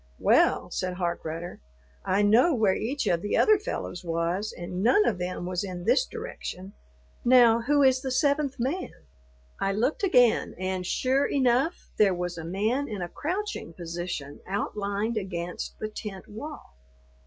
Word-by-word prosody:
"Well," -, -, +3 dB
said 185 Hz, -1 st, -2 dB
Harkrudder, 170 Hz, -1 st, -4 dB, 0.4 s
"I 195 Hz, +2 st, +2 dB
know 240 Hz, +10 st, +5 dB
where 215 Hz, -5 st, +3 dB
each 270 Hz, +9 st, -2 dB
of 170 Hz, -1 st, +1 dB
the 205 Hz, -, 0 dB
other 430 Hz, -2 st, +5 dB
fellows 400 Hz, -, -5 dB
was, 170 Hz, +5 st, -1 dB
and 180 Hz, +1 st, -5 dB
none 255 Hz, -, +4 dB
of 195 Hz, -6 st, 0 dB
them 180 Hz, 0 st, -3 dB
was 180 Hz, +1 st, -2 dB
in 180 Hz, -3 st, -6 dB
this -, -, +3 dB
direction. 205 Hz, -, -7 dB, 0.5 s
Now 240 Hz, -2 st, +6 dB
who 285 Hz, +4 st, +3 dB
is 260 Hz, -1 st, +4 dB
the 265 Hz, -, -3 dB
seventh 280 Hz, +1 st, +1 dB
man?" 280 Hz, +10 st, -2 dB, 0.7 s
I 195 Hz, -, 0 dB
looked 240 Hz, +9 st, 0 dB
again, 250 Hz, -, +3 dB
and, 185 Hz, 0 st, -3 dB
sure 265 Hz, +6 st, +1 dB
enough, 265 Hz, +4 st, +1 dB
there 200 Hz, -3 st, +5 dB
was 180 Hz, 0 st, -3 dB
a -, -, -6 dB
man 215 Hz, -, -1 dB
in 205 Hz, -4 st, -4 dB
a 175 Hz, -, -5 dB
crouching 365 Hz, -, -4 dB
position 170 Hz, -4 st, -5 dB
outlined 205 Hz, +2 st, -2 dB
against 180 Hz, -3 st, -4 dB
the 215 Hz, -, -3 dB
tent 210 Hz, -3 st, -8 dB
wall. 290 Hz, -, -9 dB
210 Hz, 155 wpm, -27 LUFS, 180-260 Hz, 0.7 s, Now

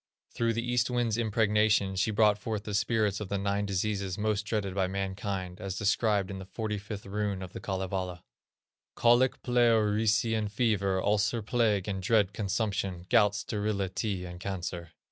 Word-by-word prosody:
Through 115 Hz, -1 st, +1 dB
the 115 Hz, +1 st, -2 dB
East 120 Hz, -1 st, +1 dB
wind's 120 Hz, -3 st, 0 dB
impregnation 105 Hz, -3 st, +2 dB
she 95 Hz, +4 st, +1 dB
brought 105 Hz, -1 st, +3 dB
forth 105 Hz, -1 st, -3 dB
the 105 Hz, -, -5 dB
spirits 105 Hz, -1 st, +1 dB
of 105 Hz, -3 st, -6 dB
the 100 Hz, -, -1 dB
nine 100 Hz, +1 st, -1 dB
diseases 100 Hz, -1 st, -1 dB
most 105 Hz, -1 st, -1 dB
dreaded 105 Hz, -4 st, -1 dB
by 95 Hz, -1 st, +1 dB
mankind, 95 Hz, 0 st, -4 dB
as 95 Hz, -2 st, -4 dB
described 105 Hz, -1 st, +1 dB
in 95 Hz, -, -6 dB
the 95 Hz, -, -8 dB
45th 105 Hz, -1 st, -5 dB
Rune 100 Hz, -1 st, -2 dB
of 90 Hz, -, -9 dB
the -, -, -6 dB
Kalevala: 95 Hz, -2 st, -3 dB, 0.7 s
"Colic, 120 Hz, +2 st, +3 dB
Pleurisy, 115 Hz, -2 st, +3 dB
and 110 Hz, -2 st, -1 dB
Fever, 100 Hz, -4 st, +1 dB
Ulcer, 105 Hz, +3 st, +1 dB
Plague, 105 Hz, -4 st, +1 dB
and 95 Hz, -2 st, -2 dB
dread 100 Hz, -1 st, +2 dB
Consumption, 100 Hz, -3 st, -2 dB
Gout, 105 Hz, -4 st, +5 dB
Sterility, 100 Hz, -2 st, -2 dB
and 90 Hz, 0 st, -8 dB
Cancer." 90 Hz, -3 st, -5 dB
105 Hz, 160 wpm, -29 LUFS, 95-110 Hz, 0.7 s, Gout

